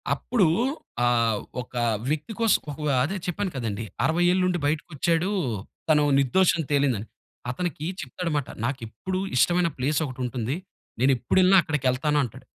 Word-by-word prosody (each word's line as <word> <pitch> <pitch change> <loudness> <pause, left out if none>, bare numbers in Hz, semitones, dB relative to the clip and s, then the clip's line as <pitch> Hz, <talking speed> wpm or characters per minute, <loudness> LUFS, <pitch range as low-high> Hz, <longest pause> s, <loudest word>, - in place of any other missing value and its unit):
అప్పుడు 225 -8 +1 0.6
ఆహ్, 115 -3 +2 0.2
ఒక 125 - -14 0.4
వ్యక్తి 155 +9 -2
కోసం 225 -2 +4
ఒకవహ్‌ 150 -1 -2
అదే 175 +9 -2
చెప్పాను 185 +1 -2
కదండీ. 115 -4 -3 0.2
60 170 +2 +2
ఏళ్ళుండి 180 -1 +1
బయటకొచ్చాడూ 165 +3 0 0.6
తను 150 -1 +5 0.2
నిర్దోషని 165 +3 +3
తేలిందని 135 -7 +1 0.4
అతనికి 155 +1 -3 0.2
చెప్తాడమాట. 150 +1 -3 0.2
నాకెప్పుడు 135 +9 -4 0.2
ఇష్టమైన 175 +5 +3
ప్లేసొకటుంటుంది. 130 -3 -1 0.5
నేనెప్పుడెళ్ళిన 135 +9 +4
అక్కడికెళ్తాను 150 0 0
అంటాడు. 120 - -8
150 Hz, 110 wpm, -25 LUFS, 125-175 Hz, 0.6 s, తను